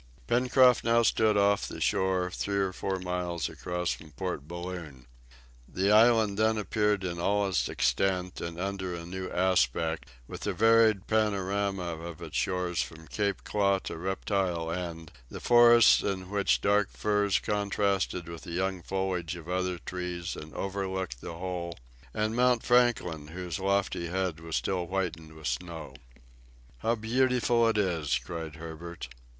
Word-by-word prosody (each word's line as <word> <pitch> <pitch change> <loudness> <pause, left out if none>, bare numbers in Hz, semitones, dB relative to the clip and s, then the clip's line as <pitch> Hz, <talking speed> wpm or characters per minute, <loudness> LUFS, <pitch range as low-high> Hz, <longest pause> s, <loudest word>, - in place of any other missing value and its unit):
Pencroft 125 - +4
now 115 +1 +4
stood 110 -2 +3
off 100 0 +3
the - - -7
shore, 95 -2 +1
three 100 +2 -2
or 95 -1 0
four 95 0 -2
miles 90 -4 -2
across 90 -1 -3
from 80 - -7
Port 75 -3 -5
Balloon. 85 -7 -7 0.6
The 95 +2 0
island 110 -2 +5
then 110 0 +3
appeared 105 0 0
in 85 -2 -3
all 100 +3 +1
its 80 -11 0
extent 90 -1 0
and 85 0 -5
under 95 -1 -3
a 85 0 -7
new 95 +1 -5
aspect, 80 -3 +1 0.2
with - - -8
the - - -1
varied 110 -2 +4
panorama 100 -3 0 0.2
of 85 -1 -8
its - - -8
shore 90 -1 0
from 80 -1 -4
Claw 100 -1 0
Cape - - -11
to - - -5
Reptile 95 -2 -1
End, 85 -2 -5 0.2
the - - -7
forests 120 -1 +7
in 95 -1 -3
which 100 -1 +2
dark 105 0 +3
firs 105 -2 +1
contrasted 100 -3 -1
with 85 -1 -8
the 85 - -8
young 95 +1 -1
foliage 95 -2 -2
of 85 -2 -10
other 90 0 -1
trees 90 0 -5
and 75 +1 -9
overlooked 95 -8 -3
the 85 - -7
whole, 85 -1 -4 0.3
and 110 - -1
Mount 125 -1 +3
Franklin 120 -11 +2
whose 90 +3 -5
lofty 95 -3 0
head 90 -2 -2
was 80 -1 -5
still 90 -2 -1
whitened 85 -4 -3
with 80 -1 -11
snow. 80 +6 -4 0.9
"How 115 - +1
beautiful 120 0 +2
it 110 -1 +1
is!" 85 -10 +1
cried 80 +4 -6
Herbert. 85 +1 -8
95 Hz, 155 wpm, -29 LUFS, 85-105 Hz, 0.9 s, forests